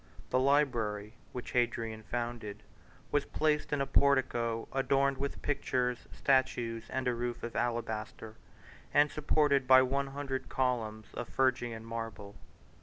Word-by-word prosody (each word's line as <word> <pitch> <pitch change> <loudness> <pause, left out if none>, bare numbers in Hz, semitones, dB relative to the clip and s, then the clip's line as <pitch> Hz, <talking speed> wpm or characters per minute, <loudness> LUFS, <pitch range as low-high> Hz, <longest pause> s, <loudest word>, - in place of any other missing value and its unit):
The 130 - +3
library, 120 -7 +1 0.2
which 125 - -6
Hadrian 115 -2 0
founded, 120 -3 -4 0.5
was 145 - +2
placed 150 -1 0
in 145 -1 +1
a - - +2
portico 130 -5 +2
adorned 135 0 +2
with 140 0 -4
pictures, 125 -4 -1
statues, 120 -4 +1
and 130 -1 -2
a 125 - +2
roof 120 0 -3
of 120 - -5
alabaster, 110 -2 -3 0.6
and 145 +1 +5
supported 145 -3 +2
by 130 0 +8
one 140 +2 0
hundred 135 -1 -4
columns 110 -4 -1
of 120 - -5
Phrygian 120 -4 0
marble. 115 -3 -6
125 Hz, 130 wpm, -32 LUFS, 115-135 Hz, 0.6 s, by